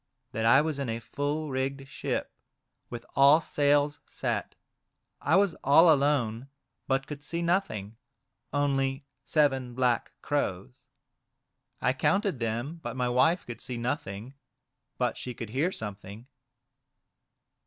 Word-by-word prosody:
" 125 -1 -51
That 110 0 0
I 130 +5 +7
was 155 -2 -2
in 135 -4 -2
a 115 +1 -2
full 145 +5 -3
rigged 135 +1 -2
ship, - - -3 0.6
with 120 -1 -7
all 140 +3 +7
sails 145 -1 +2
set; - - -3 0.7
I 150 +5 +3
was 195 -3 +4
all 160 +4 +7
alone, 135 -4 0 0.4
but 135 0 +1
could 145 -1 -7
see 170 +3 -3
nothing, 115 - -1 0.5
only 135 -1 0 0.2
seven 135 -4 +1
black 125 -2 +1
crows. 125 -1 -2 1.0
I 130 - +2
counted 195 - +1
them, 120 +8 -3
but 120 -3 -5
my 125 -1 +1
wife 135 +9 +3
could 120 - -8
see 125 - -5
nothing, 120 -2 -4 0.6
but - - 0
she 125 -1 -6
could 115 -3 -7
hear 145 +9 +1
something." 105 - -7
135 Hz, 130 wpm, -28 LUFS, 120-145 Hz, 1.0 s, I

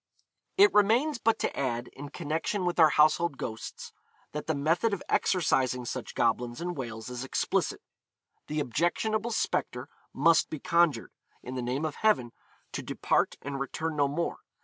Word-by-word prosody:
It 400 0 +7
remains 235 +7 +3
but 225 0 +2
to - - -2
add, 120 -3 -2
in 145 +1 -9
connection 165 +5 -2
with 175 0 -1
our 160 -2 +8
household 155 0 +3
ghosts, 110 -1 -6 0.4
that 150 - -5
the 160 - +1
method 165 +9 +1
of 180 - -10
exorcising 130 -8 +1
such 125 +1 -5
goblins 120 +1 0
in 175 +1 -3
Wales 115 -7 -6
is 125 0 -4
explicit. 135 - -1 0.6
The 150 0 -1
objectionable 210 - 0
spectre 130 - -2 0.2
must 165 +4 +3
be 155 - -4
conjured, 170 -1 +2 0.3
in 125 - -6
the 130 - -3
name 130 +5 -2
of 155 - -4
Heaven, 205 - +2 0.4
to - - -4
depart, - - 0
and 140 0 -4
return 160 +4 -3
no 145 -1 +3
more. 160 +5 -2
150 Hz, 160 wpm, -29 LUFS, 130-175 Hz, 0.6 s, our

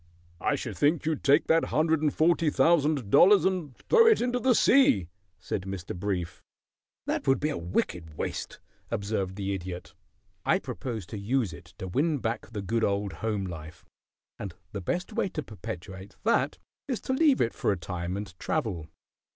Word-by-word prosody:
"I - - +1
should - - -5
think 155 +3 +2
you'd 160 -2 -1
take 145 +3 +5
that 165 0 +3
hundred 160 0 +2
and 150 -2 +2
forty 165 +1 +3
thousand 150 -8 +2
dollars 195 +2 +7
and 180 -9 -1
throw 460 -1 +5
it 445 - +6
into 245 0 0
the 255 0 +3
sea," 110 - +4 0.3
said - - -3
Mr. 95 -1 -6
Brief. 90 -2 -3 0.6
"That - - -2
would 135 - +4
be 150 +1 0
wicked 85 -2 -3
waste," - - -4 0.3
observed 100 -2 -2
the 100 -1 -2
Idiot. 90 -3 -6 0.5
"I - - +3
propose 110 +1 -5
to 105 - -7
use 110 -2 0
it 80 +3 -13
to 95 - -5
win 145 - +1
back 115 -2 -3
the 105 -4 -5
good 115 +4 0
old 100 0 0
home 105 -3 -2
life, 80 -2 -8 0.5
and 95 -4 -6 0.2
the 100 - -5
best 180 - -2
way 200 - 0
to 155 - -4
perpetuate 95 -1 -8
that 230 +2 +2 0.3
is 255 -5 -1
to 260 - -2
leave 285 0 +4
it 115 - +1
for - - 0
a 100 - 0
time 90 +1 -4
and 100 -3 -6
travel. 85 -8 -2
105 Hz, 175 wpm, -28 LUFS, -, 0.6 s, dollars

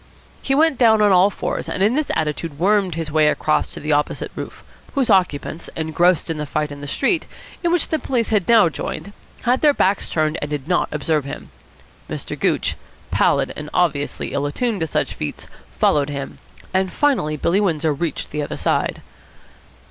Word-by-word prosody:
He 270 - 0
went 310 -1 +3
down 225 -3 +5
on 205 - +5
all 185 +2 +6
fours, - - -4
and 190 - 0
in 215 +4 +3
this 305 +2 0
attitude 150 -1 -2
wormed 190 0 +2
his 165 -2 -4
way 155 0 +4
across 155 0 +1
to - - -8
the 150 - -3
opposite 145 0 0
roof, - - -7 0.3
whose 260 -5 +2
occupants, 170 -4 +1
engrossed 165 +2 +2
in 165 -2 -3
the 150 - -3
fight 150 +1 -2
in 145 0 -8
the 145 - -6
street, 300 - +1 0.4
in 340 - +2
which 350 -2 +1
the 315 - 0
police 245 -6 -1
had 210 -5 +1
now 225 -6 +7
joined, 200 +5 -5 0.3
had 250 +1 +2
their 295 -2 +5
backs 195 +1 +1
turned 155 0 0
and 145 - -3
did 145 -2 -4
not 180 - +1
observe 155 -3 0
him. 70 - -8 0.6
Mr. - - -5
Gooch, - - +1 0.4
pallid - - +2
and 150 0 -6
obviously 150 -5 0
ill 140 +1 0
attuned 225 - -1
to 160 - -1
such - - -1
feats, 75 - -5 0.3
followed 145 - +3
him; 140 -1 -6 0.3
and 190 0 +1
finally 250 - +1
Billy 180 +7 +2
Windsor 160 -5 +1
reached 160 +3 -3
the 150 - -2
other 145 - -4
side. - - 0
170 Hz, 190 wpm, -21 LUFS, 150-215 Hz, 0.6 s, now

